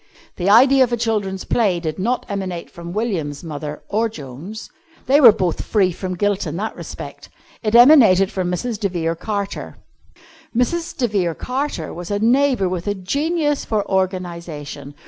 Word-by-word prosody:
The 180 +1 0
idea 260 +5 +6
of 245 - -1
a 240 - +1
children's 210 -5 -1
play 200 -7 +1
did 160 -1 -4
not 235 +6 -1
emanate 190 -4 -5
from 170 0 -9
William's 175 -9 -3
mother, 150 -2 -6
or 225 +2 0
Joan's. 160 - -9 0.4
They 280 +3 +4
were 240 -5 +10
both 185 -5 -1
free 195 -4 +2
from 185 +1 -5
guilt 205 0 0
in 155 +2 -4
that 215 +3 -3
respect. - - -9 0.3
It 215 0 0
emanated 235 -8 +7
from 185 -2 -2
Mrs. 210 +5 -3
de 200 -3 0
Vere 165 -2 -1
Carter. 200 +2 -4 0.8
Mrs. 330 +7 -1
de 245 - +1
Vere 185 -6 -1
Carter 260 - -3
was 175 0 -7
a 205 - 0
neighbour 245 -1 +2
with 180 +1 -4
a 205 - 0
genius 295 - -1
for 215 -2 -1
organisation. 170 -7 -3
200 Hz, 165 wpm, -20 LUFS, 175-235 Hz, 0.8 s, were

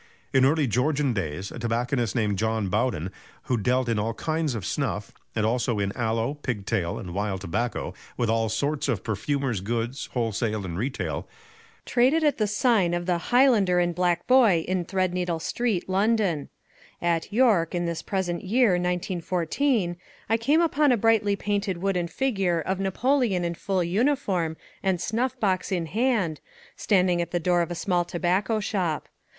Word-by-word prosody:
In 130 -1 +5
early 150 +2 +3
Georgian 135 +3 +1
days 95 -1 -3
a - - -7
tobacconist 120 -1 -1
named 105 -4 0
John 110 -3 0
Bowden, 105 -4 0 0.3
who 125 - 0
dealt 125 +3 +1
in 115 -2 +1
all 110 +2 -2
kinds 155 -3 -1
of 105 -5 -4
snuff, - - -2 0.2
and 110 -1 +1
also 120 0 0
in 100 -1 0
"Aloe, 115 +2 0
Pigtail, 105 - -2
and 90 -2 -7
Wild 100 -1 -2
Tobacco; 105 +6 -2 0.2
with 120 - 0
all 115 0 +1
sorts 140 +7 -1
of - - -1
perfumer's 120 0 -1
goods, 115 +5 -3
wholesale 110 -3 -1
and 85 -2 -5
retail," 125 +9 -3 0.6
traded 265 +7 +3
at 295 -4 +2
the 215 - +2
sign 205 -4 +2
of 175 0 -3
"The 175 -1 +1
Highlander 240 -8 +4
and 175 0 +1
Black 175 0 0
Boy" 225 -11 +5
in 185 -1 -1
Threadneedle 180 -2 -1
Street, 220 +2 -1
London. 195 -5 +1 0.5
At 170 +1 0
York, 210 -8 +3
in 175 0 0
this 170 -1 -3
present 185 -3 -2
year, 230 +5 +3
1914, 180 - 0 0.3
I 225 - +3
came 280 +9 +3
upon 300 -4 +3
a 245 - +3
brightly 215 -2 +3
painted 200 -2 -1
wooden 180 -1 -1
figure 195 -5 0
of 185 +4 -2
Napoleon 210 0 +1
in 170 - -1
full 185 +1 -1
uniform 185 - 0 0.2
and 190 -2 +1
snuff 235 +7 -1
box 190 -3 0
in 175 -3 0
hand, 215 -5 0 0.3
standing 180 -4 +2
at 170 - -3
the 175 - -1
door 175 +1 +2
of 170 - -2
a 175 - -4
small 175 -1 +1
tobacco 185 +5 0
shop. 185 -7 -2
175 Hz, 165 wpm, -26 LUFS, 120-200 Hz, 0.6 s, In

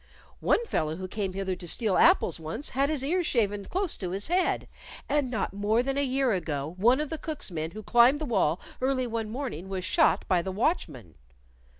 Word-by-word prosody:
One 470 - +2
fellow 155 - -1
who 185 +2 -6
came 195 -1 -3
hither 190 -1 -2
to 175 -1 -9
steal 205 +2 +1
apples 320 - +4
once 160 - -4
had 275 +2 +1
his 290 -4 0
ears 350 +3 +1
shaven 205 -4 0
close 380 -1 -2
to 185 - -4
his 195 - -1
head, 360 +1 +1 0.4
and 290 -2 +1
not 220 -6 -2
more 210 +4 +1
than 270 +1 -1
a 280 - +1
year 265 -2 +1
ago 155 -5 -2
one 240 +8 +4
of 300 -1 -3
the 320 - -3
cook's 310 - -5
men 160 -1 -3
who 215 +5 -9
climbed 240 +6 +5
the 310 - -3
wall 190 - +1 0.2
early 260 -1 +1
one 225 -2 -3
morning 220 - -5
was 185 -1 -3
shot 205 - +3
by 180 -3 +3
the 190 - -4
watchman." 160 - -2
220 Hz, 210 wpm, -28 LUFS, 185-275 Hz, 0.4 s, climbed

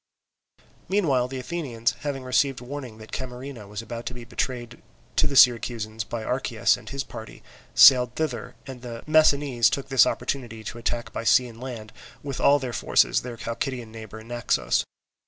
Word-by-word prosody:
Meanwhile 145 -11 +2
the 135 +1 -6
Athenians, 130 -5 -2
having 140 -2 -4
received 130 +1 +1
warning 125 -3 -7
that 110 0 -13
Camarina 125 -3 -6
was 105 +2 -6
about 115 +1 -7
to 125 - -5
be 120 - -8
betrayed 120 -1 -4 0.4
to 150 - +4
the 140 - -4
Syracusans 115 -4 +4
by 115 +1 -5
Archias 120 -2 +1
and - - -11
his 135 0 -3
party, 110 - -10 0.3
sailed 125 -3 +8
thither; 135 -8 -3
and 130 -3 -9
the 120 -2 -7
Messinese 145 -6 +4
took 135 +2 -3
this 135 -4 +6
opportunity 115 -5 -3
to 120 +2 -7
attack 120 0 -3
by - - -4
sea 125 +2 +5
and 115 0 -12
land 115 -5 -7 0.3
with 140 -2 -5
all 145 - +6
their 130 -4 -5
forces - - +3
their 120 -2 -7
Chalcidian 115 0 -4
neighbour, 110 -1 -9
Naxos. 120 0 0
125 Hz, 170 wpm, -25 LUFS, 115-135 Hz, 0.4 s, sailed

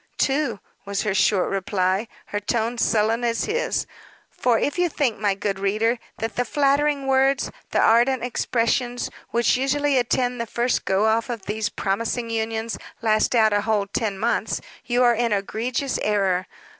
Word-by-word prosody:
"Two," 270 -6 0 0.2
was 200 0 -2
her 210 -3 0
short 195 -1 +2
reply, 190 +1 0 0.2
her 205 - -3
tone 230 +3 -1
sullen 225 +2 +2
as 230 -1 0
his. 470 +3 -1 0.5
For 240 -2 +1
if 290 +8 -1
you 355 -1 +3
think 275 -7 -1
my 205 -2 +1
good 195 -1 -2
reader, 215 +4 +1 0.2
that 225 +1 -4
the 245 - +2
flattering 280 +2 +1
words, 270 0 +2 0.2
the - - -1
ardent 240 +2 +4
expressions, 245 0 -1 0.2
which 235 +1 +2
usually 275 +1 +1
attend 245 0 0
the 235 - -4
first 240 +3 0
go 195 +2 +2
off 225 +2 +1
of 230 -5 -5
these 210 +1 -2
promising 230 +4 -2
unions 225 0 -2 0.2
last 215 +2 +2
out 220 -2 +4
a 205 - +2
whole 210 -2 +1
ten 200 0 -2
months, 230 +4 0 0.3
you 245 0 +2
are 240 -1 +5
in 235 0 0
egregious 235 +6 -1
error. 195 -3 +1
230 Hz, 165 wpm, -23 LUFS, 210-250 Hz, 0.5 s, are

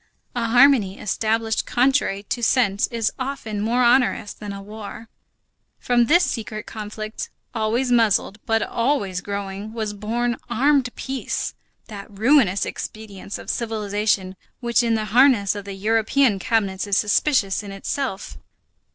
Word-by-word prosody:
A 235 -2 -1
harmony 240 -5 +5
established 220 +2 -1
contrary 245 -6 +1
to 240 +4 -3
sense 220 -4 +2
is 230 -2 -1
often 255 -6 -4
more 240 +4 +1
onerous 240 -4 +3
than 210 -1 -8
a 200 - -6
war. 215 +2 -9 0.7
From 240 -1 +2
this 345 +8 +4
secret 215 -2 -4
conflict, 215 0 -6 0.2
always 235 +3 0
muzzled, 220 -3 +2
but 225 -1 +2
always 220 -8 -1
growling, 200 +2 -5
was 220 -2 -3
born 230 +3 -2
armed 265 +2 +2
peace, 265 -1 -3 0.3
that 200 -3 -8
ruinous 210 -2 +3
expedient 210 -2 -7
of - - -4
civilization 210 -4 -1 0.2
which 235 -2 +2
in 230 -1 +1
the 215 -1 -1
harness 245 -6 +5
of 205 -1 -7
the 200 -1 -6
European 220 +2 +2
cabinets 200 -2 0
is 200 0 +2
suspicious 210 -2 +2
in 205 -1 -9
itself. 195 +2 -4
220 Hz, 135 wpm, -22 LUFS, 205-240 Hz, 0.7 s, harmony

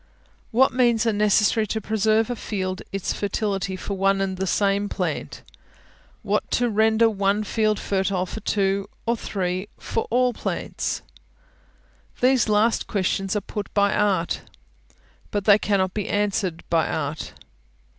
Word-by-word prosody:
What 255 +3 +3
means 240 -3 +3
are 225 - +2
necessary 210 +1 +3
to 220 - -2
preserve 220 +1 +2
to 245 - -3
a - - -6
field 185 -4 -3
its 195 -1 -2
fertility 200 -2 -2
for 200 - -5
one 195 0 +2
and 195 -1 -1
the 190 +1 -2
same 200 +1 +1
plant? - - -3 0.8
what - - 0
to 245 -1 +2
render 220 +2 +4
one 200 -1 +1
field 215 0 +1
fertile 190 -1 0
for 200 - -6
two, 200 -1 0 0.2
for 235 - +2
three, 190 -2 -3
for 225 - -3
all 250 +1 +2
plants? - - -3 1.2
These 255 -3 +3
last 215 +2 +2
questions 195 0 -1
are 210 - 0
put 205 +1 -6
by 200 0 +3
Art, 190 -5 +1 0.9
but 205 -1 -2
they 205 -1 +7
cannot 190 -3 +1
be 210 -3 -3
answered 200 -4 -1
by 165 -2 +3
Art. 150 0 -3
205 Hz, 145 wpm, -24 LUFS, 195-220 Hz, 1.2 s, they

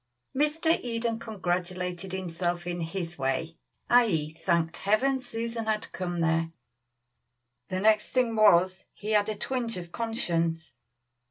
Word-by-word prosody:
Mr. 310 +4 +2
Eden 230 -1 -2
congratulated 180 -3 -3
himself 175 -1 -2
in 175 -1 -3
his 170 -1 -4
way, 135 +5 -1 0.3
i.e., 175 -11 +3
thanked 170 0 0
Heaven 260 +7 +2
Susan 230 -2 -4
had 215 0 -1
come 175 -2 -3
there; 165 0 +2 1.2
the 185 - -1
next 215 0 +4
thing 245 -3 +1
was, 185 -3 +4
he 210 +1 -5
had 210 0 +3
a 215 - -1
twinge 235 0 -2
of 175 -1 -7
conscience. 170 - -1
190 Hz, 125 wpm, -28 LUFS, 170-230 Hz, 1.2 s, next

